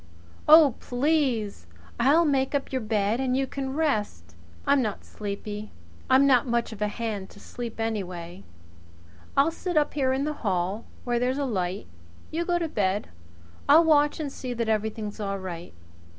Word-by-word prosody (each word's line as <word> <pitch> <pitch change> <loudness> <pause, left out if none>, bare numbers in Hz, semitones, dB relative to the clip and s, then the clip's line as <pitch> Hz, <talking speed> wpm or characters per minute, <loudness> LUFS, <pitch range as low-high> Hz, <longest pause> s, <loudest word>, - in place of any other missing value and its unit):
"Oh, 310 -4 +8
please! 245 - 0 0.3
I'll 295 +7 +5
make 275 -1 +1
up 280 - -2
your 260 -1 -1
bed 215 +1 0
and 260 -1 +1
you 270 - +1
can 265 0 -4
rest 210 - -1 0.2
" 85 - -24
"I'm 280 -1 +4
not 215 -4 -3
sleepy. 210 +1 -6 0.4
I'm 265 +2 +6
not 255 -3 +4
much 235 -1 0
of 215 -2 -10
a 210 - +2
hand 210 -3 -4
to - - -15
sleep 235 +1 -7
anyway. 185 -5 -4 0.9
I'll 285 +4 +5
sit 350 0 -3
up 295 - +2
here 265 -3 +1
in 265 +1 0
the 300 +1 -1
hall, 190 +1 -1 0.2
where 240 -1 0
there's 250 +2 0
a 285 - 0
light. 190 -5 -2 0.5
You 335 +2 -1
get 350 -1 +2
to 330 - 0
bed. 205 -7 -1 0.6
I'll 315 +4 +8
watch 295 -2 +3
and 295 -3 -3
see 250 -2 -5
that 230 -1 -1
everything's 215 0 -2
all 200 -1 -2
right. 175 -3 -7
235 Hz, 175 wpm, -26 LUFS, 205-280 Hz, 0.9 s, Oh